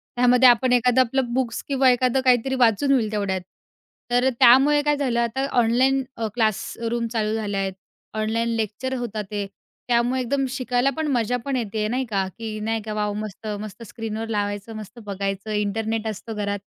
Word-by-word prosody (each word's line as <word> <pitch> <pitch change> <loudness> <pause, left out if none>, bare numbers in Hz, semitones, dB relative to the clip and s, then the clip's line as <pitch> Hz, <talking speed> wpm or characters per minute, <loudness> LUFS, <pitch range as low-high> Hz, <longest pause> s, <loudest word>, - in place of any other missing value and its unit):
त्यामध्ये 250 +1 +6
आपण 245 +1 +3
एखादं 250 +1 +4
आपलं 255 0 0
बुक्स 245 -3 -1
किंवा 270 -2 +3
एखादं 255 +1 +2
काहीतरी 255 +1 +3
वाचून 245 +2 +3
होईल 230 -6 +2
तेवढ्यात, 200 -3 -1 0.7
तर 245 +2 +3
त्यामुळे 275 +5 +6
काय 295 0 +2
झालं, 255 -4 0
आता 235 +3 0
ऑनलाईन 260 +4 +3
अ, 225 - -1
क्लासरूम 230 +1 -1
चालू 215 -1 0
झालं 205 -2 -2
आहेत, 195 -1 -1 0.4
ऑनलाईन 220 +2 -1
लेक्चर 225 +4 -3
होता 225 -3 -3
ते, 205 -1 -2 0.4
त्यामुळे 245 +2 +2
एकदम 270 +2 0
शिकायला 255 0 0
पण 315 -1 -1
मजा 245 -1 +1
पण 275 -1 -1
येते, 215 -3 -2
नाही 255 +4 -1
का, 195 -3 0
की 220 -2 -5
नाही 225 +1 -1
का, 215 0 -5
वॉव! 210 -1 -1
मस्त, 215 0 -6
मस्त 215 +2 -8
स्क्रीनवर 225 0 -5
लावायचं, 205 0 -2
मस्त 215 +1 -9
बघायचं. 195 +1 -3
इंटरनेट 220 +2 -1
असतो 220 +1 -5
घरात, 205 -1 -2
230 Hz, 170 wpm, -23 LUFS, 215-255 Hz, 0.7 s, त्यामध्ये